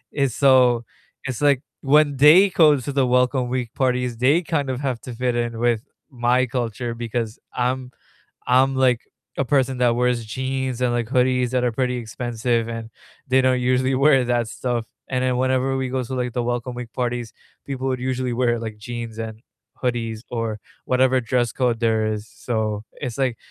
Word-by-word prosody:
and 140 Hz, -3 st, +1 dB
so, 125 Hz, -3 st, +4 dB, 0.4 s
it's, 130 Hz, 0 st, -4 dB
like, 140 Hz, -3 st, +3 dB, 0.2 s
when 145 Hz, 0 st, +4 dB
they 165 Hz, +8 st, +7 dB
go 155 Hz, -5 st, +5 dB
to 140 Hz, +3 st, -5 dB
the 135 Hz, -2 st, +2 dB
welcome 125 Hz, 0 st, +2 dB
week 125 Hz, -2 st, -3 dB
parties, 125 Hz, -2 st, 0 dB
they 140 Hz, +8 st, +3 dB
kind 145 Hz, -4 st, -1 dB
of 130 Hz, +1 st, -3 dB
have 130 Hz, -4 st, -2 dB
to 125 Hz, -, -8 dB
fit 125 Hz, 0 st, -1 dB
in 120 Hz, -1 st, -2 dB
with 120 Hz, -2 st, +2 dB, 0.3 s
my 125 Hz, 0 st, +2 dB
culture 120 Hz, -1 st, -3 dB
because 115 Hz, -1 st, -4 dB, 0.2 s
I'm 125 Hz, +1 st, -1 dB, 0.6 s
I'm, 130 Hz, +2 st, +4 dB
like, 125 Hz, -3 st, +3 dB, 0.4 s
a 135 Hz, -, +2 dB
person 130 Hz, -2 st, +1 dB
that 120 Hz, -1 st, +3 dB
wears 125 Hz, -2 st, +1 dB
jeans 130 Hz, +1 st, -3 dB
and, 120 Hz, -1 st, +2 dB
like, 120 Hz, -2 st, -1 dB
hoodies 125 Hz, -1 st, +2 dB
that 125 Hz, -1 st, +1 dB
are 120 Hz, -, +1 dB
pretty 125 Hz, +1 st, -1 dB
expensive, 115 Hz, 0 st, -2 dB
and 115 Hz, -1 st, -6 dB, 0.4 s
they 130 Hz, +1 st, +4 dB
don't 130 Hz, -1 st, +2 dB
usually 130 Hz, +1 st, +1 dB
wear 135 Hz, -1 st, +4 dB
that 120 Hz, -2 st, 0 dB
stuff, 120 Hz, -1 st, -2 dB, 0.2 s
and 130 Hz, -1 st, -1 dB
then 125 Hz, -1 st, +1 dB
whenever 130 Hz, +1 st, +1 dB
we 130 Hz, -1 st, -2 dB
go 130 Hz, -1 st, -1 dB
to, 130 Hz, +2 st, -5 dB
like, 125 Hz, -2 st, -2 dB
the 125 Hz, -, -1 dB
welcome 120 Hz, +1 st, -2 dB
week 120 Hz, -2 st, -7 dB
parties, 120 Hz, -2 st, -3 dB, 0.3 s
people 135 Hz, -1 st, -4 dB
would 130 Hz, -1 st, -1 dB
usually 130 Hz, -1 st, -2 dB
wear, 120 Hz, -1 st, +1 dB
like, 110 Hz, -2 st, -6 dB
jeans 115 Hz, 0 st, -6 dB
and 110 Hz, -1 st, -6 dB, 0.4 s
hoodies 115 Hz, -3 st, -2 dB
or 115 Hz, -3 st, -2 dB, 0.3 s
whatever 130 Hz, 0 st, +3 dB
dress 120 Hz, 0 st, 0 dB
code 125 Hz, -3 st, 0 dB
there 110 Hz, -1 st, +2 dB
is, 105 Hz, +1 st, -5 dB
so, 110 Hz, -3 st, -3 dB
it's, 125 Hz, -5 st, -5 dB
like, 130 Hz, -3 st, 0 dB
125 Hz, 185 wpm, -22 LUFS, 120-130 Hz, 0.6 s, they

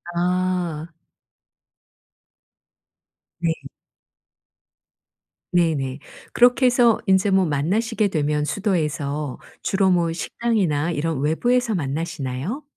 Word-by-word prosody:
아. 180 Hz, -2 st, -1 dB, 2.5 s
네. 165 Hz, -1 st, +2 dB, 2.0 s
네네. 155 Hz, -7 st, +1 dB, 0.3 s
그렇게 245 Hz, +1 st, +4 dB
해서 240 Hz, -3 st, +4 dB
인제 190 Hz, +1 st, +3 dB
뭐 190 Hz, -1 st, +4 dB
만나시게 205 Hz, -, 0 dB
되면 150 Hz, -3 st, 0 dB
수도에서 150 Hz, -, -2 dB, 0.2 s
주로 195 Hz, -1 st, +2 dB
뭐 170 Hz, -2 st, +2 dB
식당이나 175 Hz, -6 st, -1 dB
이런 160 Hz, -2 st, -2 dB
외부에서 235 Hz, -, +1 dB
만나시나요? 155 Hz, -, -3 dB
175 Hz, 190 characters per minute, -22 LUFS, 150-205 Hz, 2.5 s, 그렇게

